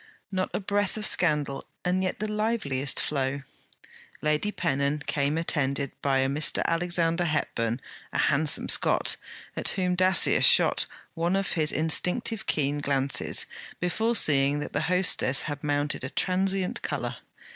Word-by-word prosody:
Not 185 -1 -1
a - - -2
breath 205 +1 -1
of 215 - 0
scandal, 150 -8 +3 0.2
and 180 +1 +1
yet 185 - -2
the 215 - -3
liveliest 210 - -1
flow. 140 -1 -2 0.8
Lady 150 +7 0
Pennon 140 -2 -1
came 145 +1 -1
attended 140 -4 -1
by 135 -1 +1
a 135 - +1
Mr. 145 +3 0
Alexander 170 0 +1
Hepburn, 120 -7 -2 0.3
a - - -3
handsome 150 +1 +1
Scot, - - +2 0.4
at - - 0
whom 180 -2 0
Dacier 185 +1 +4
shot - - +4 0.3
one 170 +2 -1
of 195 0 -1
his 155 -2 0
instinctive 185 +8 0
keen 145 -1 0
glances, 140 -1 0 0.3
before 220 +7 -1
seeing 140 -6 +3
that 150 - -6
the 145 - 0
hostess 180 -7 +3
had 145 -1 -6
mounted 145 -2 -1
a 130 - -4
transient 190 +2 -1
colour. - - -4
155 Hz, 145 wpm, -26 LUFS, 140-185 Hz, 0.8 s, Dacier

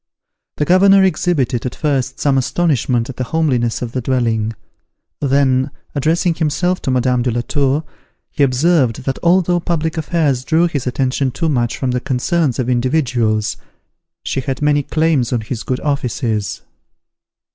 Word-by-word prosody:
The 150 - 0
governor 195 +3 +5
exhibited, 150 -10 0
at 125 - -6
first, 135 -4 -1
some 140 -2 +2
astonishment 130 -4 +1
at 125 - -15
the 130 - -2
homeliness 125 -5 0
of 120 - -5
the 130 - -3
dwelling; 115 -3 0 0.7
then, 135 -1 +2 0.2
addressing 165 +4 +1
himself 170 +3 -1
to - - -3
Madame 125 -1 +1
de 125 - 0
la 120 0 -1
Tour, 140 +4 0 0.5
he 150 - -3
observed, 135 -2 +2
that 135 0 -3
although 175 0 +3
public 165 -1 -2
affairs 150 -5 0
drew 165 +4 +2
his 140 -6 -3
attention 130 +1 0
too 165 +6 -2
much 120 -5 0
from 130 -2 -1
the 125 - 0
concerns 135 +2 0
of 125 - -1
individuals, 120 -4 0 0.7
she 135 - -2
had 130 -1 -3
many 150 0 +2
claims 155 -4 0
on 120 -3 0
his 110 +1 -5
good 125 - -2
offices. 120 -7 -2
135 Hz, 155 wpm, -17 LUFS, 125-160 Hz, 0.7 s, governor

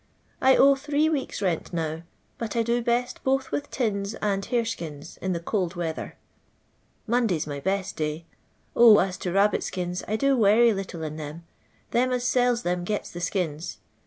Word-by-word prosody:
1 265 0 +5
owe 275 +1 +7
tliree 295 +3 0
weeks' 275 -8 -2
rent 175 -4 -1
now; 160 -2 -2 0.4
but 230 0 -4
I 230 - +2
do 235 +1 +1
best 240 +1 -1
both 265 0 0
with 290 - -3
tins 210 -4 -2
and 200 -2 -1
harcskins 195 - -3
in 190 -1 -1
the 170 - -2
cold 180 0 -2
weather. 165 -2 -4 0.9
M 225 - -1
on<lay 230 -8 +2
's 150 - -3
my 145 -1 -5
best 195 +5 -2
day. 155 +1 -3 0.5
0, 230 -3 +8
as 185 -2 +1
to 180 - -3
rab 200 +3 +4
bit - - -2
»kins, 180 -1 -3
I 215 - 0
do 275 +4 +2
werry 225 +1 +5
little 185 -4 -5
in 155 0 -5
them. 155 +2 -7 0.5
Them 255 +2 +2
as 250 -1 -1
sells 245 -1 +2
them 175 0 -1
gets 210 +3 -3
the 175 - -7
skins. 170 -3 -2
200 Hz, 190 wpm, -26 LUFS, 175-240 Hz, 0.9 s, 0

